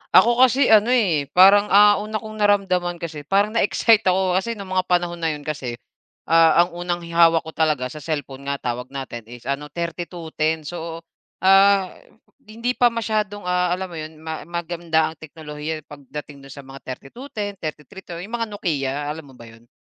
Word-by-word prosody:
Ako 235 +6 +6
kasi 260 -1 +5
ano, 215 +1 +6
eh, 185 - +2
parang, 200 +3 +7
ah, 205 0 +6
una 215 +1 -6
kong 215 0 -5
naramdaman 190 -4 +2
kasi 155 -4 -7
parang 205 +2 +2
na-excite 225 -1 +3
ako. 185 0 +2
Kasi 230 +4 -4
no'ng 195 -2 -9
mga 185 0 0
panahon 175 -1 0
na 160 -2 -1
yun 145 - -11
kasi, 135 -6 -4 0.5
ah, 165 +1 +5
ang 175 - -6
unang 175 0 -3
hi 170 - -9
hawak 165 -1 +4
ko 160 - -8
talaga, 150 -6 0
sa 155 - -8
cellphone 140 -2 -5
nga 140 - 0
tawag 125 +1 -4
natin 125 -5 -7
is 120 0 -12
ano, 140 +2 -3
3210. 165 -1 -3
So, 165 +1 -7 0.4
ah, 195 0 +5 0.5
hindi 230 +1 -4
pa 245 -1 +3
masyadong, 215 -3 -2
ah, 180 0 +1
alam 190 +1 -5
mo - - -8
yun 155 +1 -7
ma 160 +1 -6
maganda 170 -2 -1
ang - - -14
teknolohiya, 155 0 -7
eh, - - -54
pagdating 145 0 -9
do'n 135 - -11
sa 140 - -10
mga 135 +1 -11
3210, 205 - -7
332. 170 +4 -8
Yung 215 - -10
mga 230 -1 -2
Nokia, 150 -10 -2 0.2
alam 155 -2 -8
mo 130 - -16
ba 120 - -13
yun? 115 +1 -19
170 Hz, 190 wpm, -22 LUFS, 150-200 Hz, 0.5 s, parang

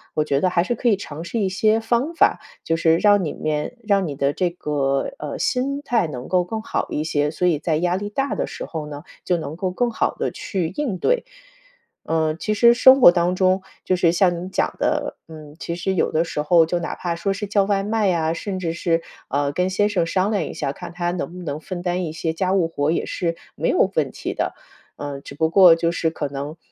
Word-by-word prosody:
我 155 - +1
觉 140 -2 +1
得 185 - +3
还 170 -1 +2
是 240 - -1
可 240 - +1
以 205 - +3
尝 160 -4 -7
试 200 +7 -3
一 200 - +1
些 215 +4 +2
方 240 +8 0
法， 330 - +3 0.3
就 165 - +1
是 165 0 +3
让 205 0 +4
里 155 - -2
面 150 +9 -3
让 200 -2 +3
你 145 - -4
的 140 0 +1
这 180 +1 0
个， 140 -5 -1
呃， 150 -1 -5
心 275 +3 0
态 240 - +1
能 125 -4 -7
够 180 -1 +2
更 220 +5 -4
好 - - -2
一 150 - -2
些， 150 -1 0
所 180 - 0
以 165 -4 +3
在 155 +1 0
压 175 +2 +1
力 205 +2 -3
大 270 +6 -1
的 - - -1
时 - - -7
候 160 -2 -5
呢 145 0 -8 0.2
就 180 -1 +1
能 155 -1 -5
够 185 +1 -2
更 240 +6 0
好 - - 0
地 - - 0
去 180 -5 -3
应 260 -11 -2
对。 485 - +1 0.8
呃， 160 -1 0
其 215 +6 -2
实 235 +2 +6
生 260 +2 +7
活 175 - +9
当 175 +1 +1
中 185 0 +2 0.2
就 185 - +2
是 175 -2 +3
像 175 0 +3
您 180 +2 -6
讲 - - 0
的， - - -1
嗯， 155 -1 -11
其 170 - -4
实 190 +2 -1
有 180 - +1
的 160 +2 +1
时 150 - -3
候 165 +2 +5
就 175 +2 -1
哪 170 - -4
怕 175 -1 -3
说 195 +4 -1
是 205 +1 -5
叫 200 0 +2
外 195 0 +1
卖 215 0 +1
呀， 165 -3 +1
甚 190 +2 -4
至 165 -3 -2
是， 165 -1 0 0.3
呃， 140 +1 0
跟 180 +4 0
先 205 +2 +2
生 180 -5 +1
商 185 +4 +1
量 200 -6 +1
一 - - -6
下， 140 -1 -3
看 175 - -9
他 175 0 -1
能 175 -1 -4
不 180 - -8
能 145 -1 -4
分 175 +2 -6
担 180 0 -1
一 155 - -4
些 160 0 -2
家 185 +3 -1
务 180 -4 +2
活 145 -2 -1
也 170 - -1
是 170 -1 -2 0.2
没 - - -1
有 - - +3
问 - - +1
题 - - -5
的。 - - -2 0.4
呃， 140 -1 -6
只 140 - -10
不 160 +2 +1
过 180 -1 +7
就 165 0 0
是 165 - 0
可 160 -2 -4
能 140 +3 -6
175 Hz, 265 characters per minute, -22 LUFS, 160-195 Hz, 0.8 s, 活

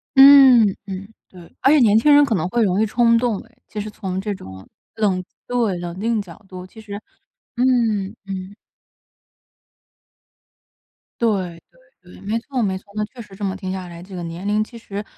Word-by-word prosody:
嗯 265 -6 +8
嗯， 195 +1 -6 0.2
对， 175 -2 -15
而 270 - +5
且 305 - +6
年 220 -3 +5
轻 290 +6 +5
人 290 0 +7
可 230 - -1
能 175 0 -1
会 235 +1 +1
容 195 +1 +1
易 - - +3
冲 230 +1 +3
动 230 -4 0
诶。 230 0 -22
其 210 - -7
实 215 - -6
从 190 -3 -5
这 205 0 -3
种 95 - -11 0.3
冷 195 -4 0 0.2
对， 230 -7 0
冷 175 +1 -6
静 225 0 0
角 195 +2 -13
度， 185 -1 -9
其 220 +4 -15
实 205 0 -8 0.5
嗯， 230 -5 +1
嗯。 195 +1 -7 2.7
对 230 - +4 0.4
对 - - -26 0.3
对， - - -14
没 215 +3 -2
错 255 +1 -4
没 190 -3 0
错， 190 - -15
那 210 - -1
确 245 +3 -17
实 205 -3 -13
这 205 - -8
么 190 -1 -1
听 190 -1 -5
下 185 -1 -5
来， 170 0 -10
这 190 0 -11
个 175 - -5
年 170 +4 -6
龄 210 +1 +2
其 235 +1 -12
实 205 -2 -6
210 Hz, 205 characters per minute, -21 LUFS, 190-230 Hz, 2.7 s, 嗯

